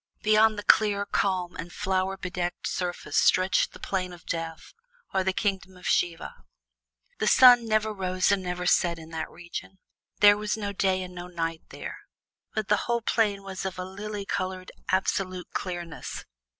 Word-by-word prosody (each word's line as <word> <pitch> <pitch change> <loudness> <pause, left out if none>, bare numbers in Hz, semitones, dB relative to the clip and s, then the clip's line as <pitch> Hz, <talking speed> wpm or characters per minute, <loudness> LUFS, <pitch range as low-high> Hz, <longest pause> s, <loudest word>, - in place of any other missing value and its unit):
Beyond 215 0 +5
the 205 - -4
clear, 205 -1 +4
calm, 185 -3 0
and 175 - -6
flower 190 +1 -1
bedecked 180 -1 -4
surface 175 -1 -2
stretched 185 +1 +3
the - - -13
Plain 185 -2 -2
of 170 -2 -14
Death, 165 -1 -5 0.4
or 190 -1 +2
the 190 - +1
Kingdom 190 -2 -2
of 180 - -14
Siva. 170 -2 0 0.8
The - - +1
sun 245 -2 +8
never 215 0 +1
rose 185 -1 +1
and 200 -1 +2
never 180 0 -3
set 175 -1 +3
in 160 0 -11
that 160 -1 -4
region; 175 +2 -8 0.4
there 205 0 +8
was 210 +1 -2
no 205 -2 -3
day 190 -1 +1
and 180 0 -9
no 175 0 -7
night 165 -2 -3
there, - - -7 0.6
but 215 -3 -1
the 210 - +4
whole 235 -1 +1
plain 205 -4 +1
was 190 -1 -6
of 190 -1 -4
a 185 - -4
lily 205 +2 -6
colored, 185 -1 -3 0.2
absolute 185 -1 -1
clearness. 175 -3 -5
185 Hz, 170 wpm, -27 LUFS, 180-205 Hz, 0.8 s, sun